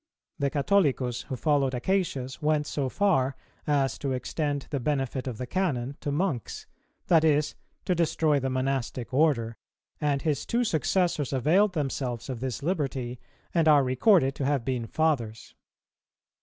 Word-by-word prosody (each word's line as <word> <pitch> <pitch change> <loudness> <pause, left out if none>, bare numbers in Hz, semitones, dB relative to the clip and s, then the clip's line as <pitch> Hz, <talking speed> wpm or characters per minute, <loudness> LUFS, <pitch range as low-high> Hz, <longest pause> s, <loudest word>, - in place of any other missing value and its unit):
The 140 -1 +1
Catholicus 140 -6 +1
who 130 - -2
followed 140 -1 +1
Acacius 135 -4 -1
went 150 -1 +1
so 140 -2 -2
far 140 -8 +1 0.3
as 140 -3 +1
to 135 -2 -2
extend 145 +2 -2
the 140 - -1
benefit 135 -1 -2
of 120 -4 -4
the 125 - -4
Canon 140 -5 -1
to 145 - -3
Monks, 145 - -2 0.4
that 165 -2 +4
is, 150 -1 +2 0.3
to 180 - +2
destroy 160 -3 +2
the 135 0 -2
Monastic 130 -2 -2
order; 125 -6 +2 0.4
and 145 -2 0
his 150 -4 0
two 240 +1 +1
successors 170 - 0
availed 170 - +3
themselves 135 -5 -3
of 125 -3 -4
this 130 +1 -4
liberty, 135 -7 -2 0.3
and 165 -2 +3
are 145 -2 +6
recorded 135 - +3
to 140 - -3
have 140 -4 0
been 125 -3 -2
fathers. 120 -8 -1
140 Hz, 150 wpm, -27 LUFS, 130-155 Hz, 0.4 s, are